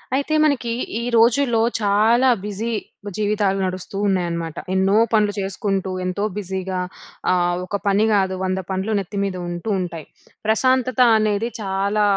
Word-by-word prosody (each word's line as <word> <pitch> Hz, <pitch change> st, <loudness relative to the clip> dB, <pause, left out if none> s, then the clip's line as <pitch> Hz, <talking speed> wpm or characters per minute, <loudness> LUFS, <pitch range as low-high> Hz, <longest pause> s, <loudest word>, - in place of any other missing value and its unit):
అయితే 285 Hz, +3 st, -1 dB
మనకి, 250 Hz, -5 st, 0 dB, 0.3 s
ఈ -, -, -4 dB, 0.2 s
రోజుల్లో 240 Hz, 0 st, +3 dB, 0.2 s
చాలా 220 Hz, +5 st, +4 dB, 0.2 s
బిజీ 210 Hz, +3 st, -3 dB, 0.5 s
జీవితాలు 205 Hz, -2 st, +1 dB
నడుస్తూ 185 Hz, +1 st, -5 dB
ఉన్నాయన్నమాట. 170 Hz, -4 st, -1 dB, 0.2 s
ఎన్నో 190 Hz, +1 st, +2 dB, 0.2 s
పనులు 210 Hz, -2 st, +3 dB
చేసుకుంటూ, 195 Hz, 0 st, -2 dB
ఎంతో 185 Hz, +3 st, -2 dB
బిజీగా 190 Hz, -1 st, -3 dB, 0.5 s
ఆహ్, 175 Hz, -1 st, +2 dB
ఒక 200 Hz, -, -4 dB
పని 200 Hz, +1 st, +3 dB
కాదు, 190 Hz, -2 st, +2 dB
వంద 185 Hz, 0 st, 0 dB
పనులు 190 Hz, +3 st, -2 dB
నెత్తి 200 Hz, +1 st, -6 dB
మీద 195 Hz, -2 st, -2 dB
ఉంటూ 175 Hz, +5 st, -5 dB
ఉంటాయి. 170 Hz, -4 st, -5 dB, 0.4 s
ప్రశాంతత 255 Hz, +3 st, +2 dB, 0.2 s
అనేది 215 Hz, +1 st, +1 dB
చాలా 200 Hz, +1 st, 0 dB
200 Hz, 135 wpm, -21 LUFS, 190-220 Hz, 0.5 s, చాలా